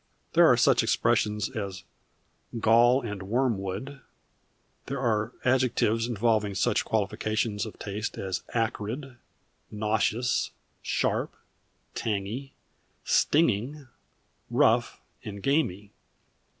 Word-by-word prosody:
There - - +7
are - - +5
such - - +4
expressions 105 -1 +1
as 100 -4 -5 0.8
"gall 120 +4 +5
and 105 -4 -5
wormwood"; 115 +3 -2 0.9
there 135 0 -3
are 110 -2 0
adjectives 125 -3 +2
involving 110 -3 +1
such - - +1
qualifications 110 +1 -1
of 110 - -10
taste 105 +2 -4
as 95 -2 -3
"acrid," 120 +3 -3 0.5
"nauseous," 110 +3 0 0.3
"sharp," - - -1 0.6
"tangy," 110 +5 -3 0.5
"stinging," 140 -1 +1 0.6
"rough," - - +2 0.2
and 100 -2 -7
"gamy." 105 - 0
110 Hz, 90 wpm, -27 LUFS, 105-125 Hz, 0.9 s, There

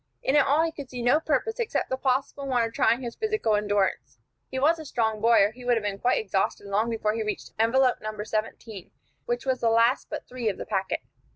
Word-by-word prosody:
In 270 - +1
it - - +7
all 295 +4 +3
he 330 - 0
could 285 -4 -9
see 245 -2 -5
no 245 +6 +4
purpose, 320 - -1
except 460 - -1
the - - +2
possible 265 +1 -1
one 250 -3 +2
of 230 0 -3
trying 245 +3 +2
his 235 -1 -5
physical 430 - 0
endurance. 205 - -1 0.3
He 260 - -5
was 315 +5 +3
a - - -6
strong 220 -5 -1
boy, 230 -2 +5
or 205 - +2
he 250 +2 -13
would 245 0 +2
have 225 - -1
been 200 -1 -3
quite 250 - +2
exhausted 195 -1 -1
long 205 +3 0
before 215 -2 -1
he 225 - -2
reached 210 -1 -4
envelope 250 +3 +3
No. 215 - -3
17, 215 -2 -5 0.4
which 240 +1 -2
was 260 -1 0
the 230 - +2
last 230 +3 +3
but - - -6
three 245 -3 -2
of 200 - -4
the - - -6
packet. 190 0 -2
235 Hz, 240 wpm, -26 LUFS, 215-265 Hz, 0.4 s, it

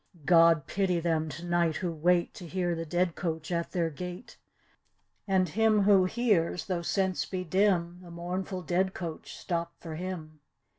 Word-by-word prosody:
God 165 -2 +5
pity 185 +1 0
them 160 -2 0
to 170 +3 -7
night 175 -2 +1
who 180 -2 -2
wait 175 +2 +2
To 175 - -9
hear 175 0 -1
the 165 0 -4
dead 175 +1 +1
coach 160 -2 -4
at 170 -1 -1
their 170 -3 -1
gate, 180 - -8 0.9
And 190 -2 +2
him 215 +3 +3
who 195 -2 +5
hears, 185 -6 +1
though 180 -3 -2
sense 190 +1 0
be 185 -1 -4
dim. 180 -1 +1
The 175 - -12
mournful 180 +2 -4
dead 185 +3 0
coach 165 -3 -6
stop 170 -1 -3
for 165 -2 -7
him. 160 -3 -6
175 Hz, 165 wpm, -29 LUFS, 165-185 Hz, 0.9 s, God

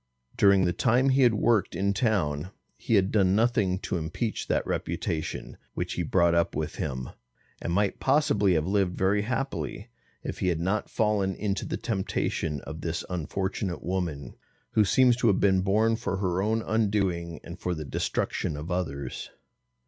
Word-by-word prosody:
During 100 -2 +5
the 90 - +1
time 125 +6 +3
he 135 +1 +3
had 120 -3 +5
worked 105 -5 +2
in 100 +3 +1
town, 90 - 0 0.3
he 115 - 0
had 95 -1 +3
done 95 -3 +3
nothing 110 -5 +2
to 90 - -2
impeach 85 +8 -3
that - - 0
reputation 80 -1 -3 0.2
which - - -2
he - - -2
brought 85 -2 +3
up 85 0 +1
with - - -3
him, 65 0 -4 0.5
and - - -3
might 100 +2 +1
possibly 130 - +3
have 80 -1 +1
lived 95 -1 +1
very 100 +2 +2
happily, 130 -1 -3 0.3
if - - -5
he - - 0
had 85 -3 +1
not 95 +5 -1
fallen 105 -3 +1
into 100 -2 -2
the - - -2
temptation 95 - -2
of 80 0 -8
this 85 0 -3
unfortunate 95 +2 -3
woman, 85 -8 -3 0.4
who 110 - +4
seems 125 +4 +4
to 125 - +2
have 100 -4 +3
been 95 -2 +3
born 110 +4 +2
for 105 -4 -3
her 95 -1 0
own 110 +2 0
undoing 100 -7 0
and 85 +2 -9
for 90 -1 -2
the 80 -1 -6
destruction 75 +2 -2
of 75 +4 -6
others. 75 -6 -3
95 Hz, 170 wpm, -27 LUFS, 85-110 Hz, 0.5 s, During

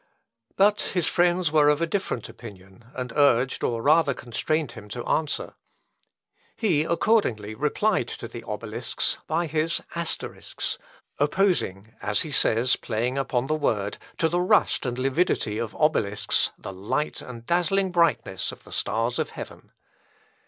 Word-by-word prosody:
" 115 0 -60
But 205 +2 +4 0.2
his 175 - +2
friends 175 -2 +2
were 150 -1 +5
of 150 0 +3
a 170 - +2
different 165 - -2
opinion, 100 0 -13
and 125 -2 -4
urged, 130 -3 +3
or 115 -1 -1
rather 150 -2 +4
constrained 150 +5 -2
him 110 -3 -11
to 120 +3 -5
answer. 155 -2 -1 1.0
He, 170 -9 +2
accordingly, 160 - +1
replied 150 - +1
to - - -6
the - - -9
Obelisks - - -2
by 165 +1 0
his 160 +2 0
Asterisks, 170 -1 -4 0.4
opposing 145 - +1
(as 105 0 +1
he 155 - -4
says, 125 -2 +3
playing 125 +4 -1
upon 130 -2 0
the 155 - 0
word) 105 -10 -1 0.2
to 165 - +3
the 175 +2 +1
rust 185 - +3
and 120 0 -2
lividity 130 -5 +1
of 115 -2 -4
Obelisks 105 -9 +1
the 95 - -8
light 105 +11 -2
and 120 -2 -9
dazzling 180 +4 +2
brightness 135 - +1
of - - -13
the - - -15
stars 115 +2 -1
of - - 0
heaven. - - -10
145 Hz, 150 wpm, -25 LUFS, 115-170 Hz, 1.0 s, were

